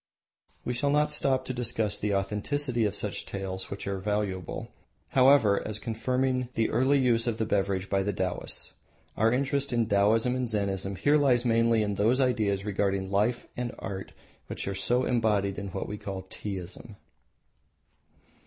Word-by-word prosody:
We 125 - -1
shall 130 +4 0
not 150 +1 +2
stop 135 -3 +1
to 130 - -3
discuss 115 -4 0
the 105 -1 0
authenticity 115 +5 -1
of 105 - -1
such - - -2
tales, 95 -1 -5
which 100 - -6
are 100 -1 -2
valuable, 100 -3 -3 0.4
however, 130 -6 +5
as 110 -1 -4
confirming 125 +2 -1
the 115 - +1
early 130 +5 +3
use 120 -3 +2
of 115 -2 0
the 110 - 0
beverage 95 -2 0
by 95 0 +1
the 100 +1 0
Taoists. 95 -2 -3 0.4
Our 110 +1 +3
interest 140 +2 0
in 120 -1 +2
Taoism 110 +5 +3
and 130 -1 -1
Zennism 100 -3 -2
here 145 - +4
lies 130 -4 +3
mainly 115 -1 +3
in 105 -1 -1
those 110 +6 +2
ideas 105 -7 +1
regarding 100 -1 -1
life 110 +5 +1
and 125 0 -4
art 95 0 -6 0.4
which - - -5
are 100 - -1
so 125 +6 +1
embodied 105 -5 +1
in 100 - -5
what 95 0 -4
we 105 0 -6
call 95 -3 -5
Teaism. 100 +2 -6
110 Hz, 165 wpm, -28 LUFS, 100-125 Hz, 0.4 s, however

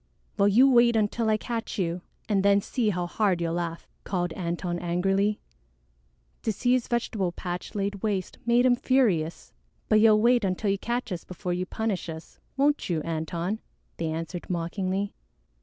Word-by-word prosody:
"Well, 200 - +4
you 235 +7 +6
wait 240 -2 +5
until 220 +1 +1
I 215 - +3
catch 230 +1 -4
you 175 -2 -1 0.3
and 200 -3 +2
then 200 0 +5
see 225 +2 -1
how 180 -3 -1
hard 190 0 +1
you'll 165 -1 -1
laugh," 170 -1 -3 0.2
called 175 -3 -2
Antone 175 0 -3
angrily. 195 +4 +1 1.0
To 220 - 0
see 245 +4 0
his 250 -1 +2
vegetable 220 -6 -1
patch 175 +2 -6
laid 200 -1 -2
waste 200 -4 -2
made 240 +1 +3
him 250 -1 +5
furious. 225 -12 +1 0.4
"But 215 - +5
you'll 215 -1 +6
wait 240 +1 +4
until 195 +2 0
you 195 - -1
catch 240 0 -2
us 175 -2 -4
before 180 0 -4
you 180 +1 -2
punish 215 -5 -2
us, 160 0 -9 0.2
won't 285 -2 +2
you, 160 -3 0
Antone?" 165 +5 -2 0.4
they 165 - -2
answered 165 +2 -5
mockingly. 185 +3 -2
195 Hz, 170 wpm, -27 LUFS, 175-225 Hz, 1.0 s, you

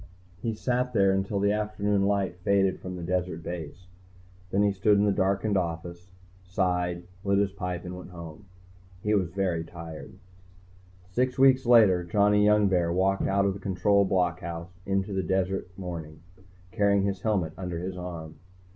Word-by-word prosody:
He 115 -1 -2
sat 125 +2 -1
there 100 -3 +4
until 95 +1 -1
the 100 +1 +2
afternoon 105 -1 0
light 100 -3 0
faded 95 +1 +2
from 90 0 -6
the 90 - -6
desert 90 -1 -2
base. 85 +1 -7 0.6
Then 100 +2 +2
he 100 - +3
stood 100 +2 +3
in 100 - +3
the 105 - +3
darkened 100 +1 +1
office, 85 +1 -4 0.3
sighed, 90 -1 -1 0.2
lit 100 0 +2
his 100 -1 +2
pipe 90 -2 -5
and 90 0 -6
went 90 0 -9
home. 85 0 -10 0.6
He 105 - +1
was 95 -5 +1
very 90 -2 -1
tired. 85 -2 -9 1.0
Six 125 +6 0
weeks 130 -1 +5
later, 105 -7 +6
Johnny 105 +3 +3
Youngbear 100 -5 +3
walked 95 +2 +1
out 100 0 +2
of 100 - +1
the 100 - -8
Control 100 +1 +2
blockhouse 85 -2 -1 0.2
into 95 +1 -1
the 95 - 0
cold - - -8
desert 95 -1 0
morning, 85 -5 -7 0.5
carrying 100 -2 +2
his 100 -1 -2
helmet 95 -8 0
under 90 -2 -5
his 90 +2 -4
arm. 85 -3 -7
95 Hz, 165 wpm, -27 LUFS, 90-100 Hz, 1.0 s, later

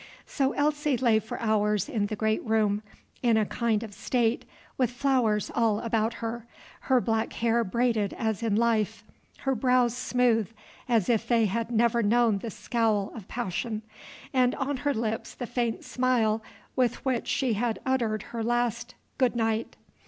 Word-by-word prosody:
So 270 -1 0
Elsie 295 -2 +1
lay 235 -3 +3
for 220 - -7
hours 210 -3 +1
in 220 -9 -1
the 215 - -3
great 220 +1 0
room, 215 -2 +1 0.4
in 235 -3 +3
a 215 - +2
kind 230 0 0
of 215 -2 -8
state, 235 +2 0 0.3
with 255 -3 +1
flowers 245 -5 +1
all 225 -3 +2
about 225 0 0
her, 235 +1 -5 0.4
her 260 -1 +5
black 225 -2 -1
hair 235 0 +1
braided 225 -1 0
as 220 -2 -2
in 225 -3 +1
life, 225 -2 +1 0.4
her 270 - +1
brows 250 -1 +2
smooth, 245 -4 +1 0.4
as 225 -6 +3
if 230 -1 +1
they 235 -2 +3
had 225 +3 -1
never 235 0 +2
known 225 -1 +3
the 230 - -5
scowl 220 -2 0
of 215 -5 -9
passion, 220 0 -3 0.5
and 255 -1 +3
on 280 0 -2
her 285 +2 0
lips 220 0 -3
the 245 - -4
faint 240 -1 -2
smile 235 -4 +1 0.3
with 250 0 0
which 255 -3 0
she 255 -4 +1
had 225 +1 -1
uttered 230 -5 0
her 230 -1 -2
last 240 +1 -1 0.2
"Good 255 -2 +2
night." 225 -1 -1
230 Hz, 165 wpm, -27 LUFS, 220-245 Hz, 0.5 s, her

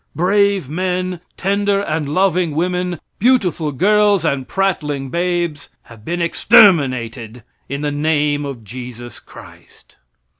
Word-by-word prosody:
Brave 200 -1 +2
men, 180 +2 -2 0.2
tender 200 +1 0
and 155 -5 -3
loving 180 -1 +1
women, 180 0 -1 0.2
beautiful 195 - +1
girls 205 +3 +2
and 135 -4 -1
prattling 150 -8 -2
babes 170 -4 -2
have 115 -2 -16
been 170 +4 -2
exterminated 130 - +3 0.3
in 140 +1 -4
the 150 -1 -1
name 145 0 0
of 135 -5 -7
Jesus 120 +2 -9
Christ. - - -17
165 Hz, 115 wpm, -18 LUFS, 140-185 Hz, 0.3 s, exterminated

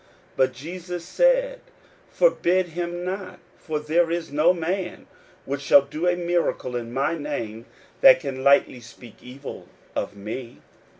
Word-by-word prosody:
41:009:039 - - -30 0.3
But 130 0 +3
Jesus 175 +5 -7
said, - - +2 0.5
Forbid 185 - +2
him 175 +1 -4
not: 190 +1 -5 0.2
for 155 -2 -3
there 165 +3 +1
is 170 -2 -3
no 155 +4 +4
man 180 +1 -3 0.4
which 140 +1 -3
shall 140 0 +6
do 155 +5 -3
a 175 - +3
miracle 175 -7 -1
in 120 -1 -4
my 140 +6 0
name, 115 -7 -5 0.3
that 270 -7 +8
can 135 -5 -5
lightly 140 -2 +4
speak 115 -1 -15
evil 135 +3 -9 0.3
of - - -3
me. 110 +4 -7
160 Hz, 145 wpm, -24 LUFS, 130-180 Hz, 0.5 s, that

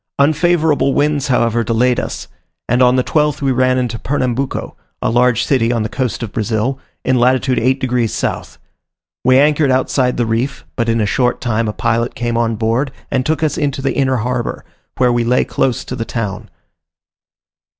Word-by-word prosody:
Unfavourable 155 -1 +2
winds, 145 -1 +1
however, 120 -3 +1
delayed 120 +2 +1
us, - - -5 0.4
and 125 +2 +2
on 125 0 +5
the 130 - +2
12th 150 +1 +1
we 135 -2 0
ran 130 0 +2
into 120 -3 -2
Pernambuco, 130 0 -2 0.2
a - - -1
large 120 -1 +3
city 120 -4 +1
on 115 -2 0
the 110 - -3
coast 125 -2 -2
of 110 - -5
Brazil, 115 +4 -1 0.3
in 130 -1 +2
latitude 130 0 +2
8 130 +3 +1
degs. 125 -3 0
south. - - -3 0.7
We 130 +1 +5
anchored 145 +1 +3
outside 130 0 +1
the 120 - +1
reef; 115 +5 -2
but 115 -1 -1
in 115 0 +1
a - - +1
short 125 +4 0
time 115 -2 -1
a - - -1
pilot 115 +1 -1
came 120 -1 -2
on 115 -1 +1
board 115 +5 0 0.2
and 130 - +1
took 160 +3 -1
us 155 - 0
into 140 -2 -2
the 135 - 0
inner 130 -1 +1
harbour, 120 +1 -3 0.3
where 125 -1 +3
we 120 0 +1
lay 125 +2 +2
close 130 -3 -1
to 125 - -5
the 115 - -3
town. 110 -4 -4
125 Hz, 185 wpm, -17 LUFS, 115-135 Hz, 0.7 s, on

